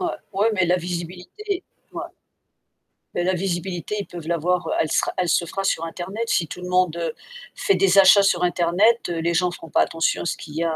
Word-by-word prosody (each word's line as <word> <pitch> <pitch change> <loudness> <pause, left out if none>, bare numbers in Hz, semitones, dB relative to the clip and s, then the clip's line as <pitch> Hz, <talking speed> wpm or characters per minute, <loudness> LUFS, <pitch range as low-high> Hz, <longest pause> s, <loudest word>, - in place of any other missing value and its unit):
Ouais 360 - -1 0.3
ouais, 205 +3 +2
mais 185 -3 +2
la 175 +1 +2
visibilité, 180 - -5 0.3
ouais. - - -5 1.1
Beh, 175 - -1
la 185 +1 +1
visibilité, 180 +1 -3
ils - - -7
peuvent 170 -2 -9
l'avoir, 175 +2 0
heu - - -2
elle 155 - 0
sera - - +1
elle 180 -1 0
se 170 - +2
fera 195 +4 -4
sur 165 -4 0
internet. 185 +6 -5
Si 165 - +1
tout 180 - -8
le 180 - -6
monde, 180 -2 +2
heu, 165 -2 -2 0.4
fait 395 - +2
des 195 0 +3
achats 195 +1 +8
sur 180 -3 +2
internet, 180 +7 +3
heu, 170 - -2
les 170 +1 0
gens 180 +2 +2
seront 165 -2 -10
pas - - +3
attention 165 0 0
à - - -7
ce - - -1
qu'il 150 -1 -11
y 165 - 0
a, 165 -1 0
180 Hz, 230 wpm, -22 LUFS, 170-190 Hz, 1.1 s, achats